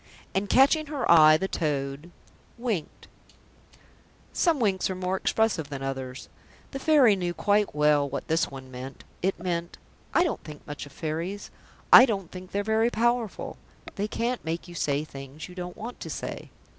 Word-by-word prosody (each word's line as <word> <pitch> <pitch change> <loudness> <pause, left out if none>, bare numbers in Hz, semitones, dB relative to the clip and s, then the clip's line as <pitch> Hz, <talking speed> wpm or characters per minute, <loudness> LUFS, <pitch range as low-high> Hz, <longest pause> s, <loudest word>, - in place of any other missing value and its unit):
And, 195 +1 -1
catching 295 +4 +4
her 285 -4 -3
eye, 155 -2 +8
the 190 - -2
toad 145 -2 -2 0.5
winked. 230 -9 -4 1.3
Some 335 -5 +2
winks 195 -6 +1
are 190 - -2
more 185 0 -1
expressive 190 -6 0
than 135 -2 -5
others. 130 -1 -5 0.4
The 275 - -5
Fairy 270 -8 +5
knew 175 -2 -3
quite 205 -3 +1
well 150 -1 +3
what 140 - -5
this 160 0 +1
one 130 -1 -10
meant. 130 +2 -8 0.2
It 190 +2 0
meant: 170 -1 -3 0.3
"I 345 - +4
don't 340 - -2
think 150 -2 -11
much 145 0 -7
of - - -15
Fairies. 165 +7 -4 0.4
I 255 - +11
don't 195 -6 -3
think 185 0 -9
they're 200 +1 -1
very 220 +2 +2
powerful. 240 -2 -1 0.4
They 205 +1 -2
can't 235 +3 -2
make 165 +2 -4
you 175 - -10
say 145 -3 0
things 140 0 -9
you 180 - -12
don't 180 -1 -7
want 235 +3 -7
to - - -7
say." - - -6
180 Hz, 170 wpm, -27 LUFS, 150-220 Hz, 1.3 s, I